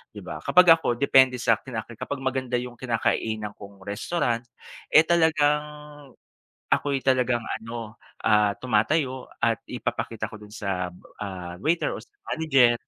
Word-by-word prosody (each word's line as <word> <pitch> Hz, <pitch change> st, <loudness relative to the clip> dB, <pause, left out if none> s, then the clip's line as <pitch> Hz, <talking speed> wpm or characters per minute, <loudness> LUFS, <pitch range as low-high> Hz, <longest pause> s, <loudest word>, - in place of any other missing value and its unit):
'di -, -, -7 dB
ba. -, -, -6 dB
Kapag 180 Hz, 0 st, +5 dB
ako -, -, -4 dB
depende 130 Hz, -2 st, +5 dB
sa'kin 120 Hz, +1 st, 0 dB, 0.2 s
kapag 145 Hz, -2 st, -4 dB
maganda 130 Hz, -1 st, -1 dB
yung 125 Hz, -1 st, -7 dB
kinakainan 110 Hz, -3 st, -1 dB
kong 100 Hz, -1 st, -12 dB
restaurant, 115 Hz, +3 st, -1 dB, 0.5 s
eh, 155 Hz, -, +9 dB
talagang 155 Hz, -3 st, +3 dB, 1.1 s
ako'y 140 Hz, -2 st, 0 dB
talagang 125 Hz, -2 st, +2 dB, 0.2 s
ano, 115 Hz, -1 st, -7 dB, 0.3 s
ah, 105 Hz, -1 st, +4 dB
tumatayo 130 Hz, +3 st, 0 dB
at -, -, +1 dB
ipapakita -, -, -3 dB
ko 110 Hz, -1 st, -10 dB
dun 105 Hz, -, -12 dB
sa, 95 Hz, -5 st, -2 dB, 0.3 s
ah, 90 Hz, -3 st, -5 dB
waiter 165 Hz, +2 st, +1 dB
o -, -, -7 dB
sa 120 Hz, -, -19 dB, 0.2 s
manager. 135 Hz, -7 st, +4 dB
125 Hz, 135 wpm, -25 LUFS, 105-140 Hz, 1.1 s, eh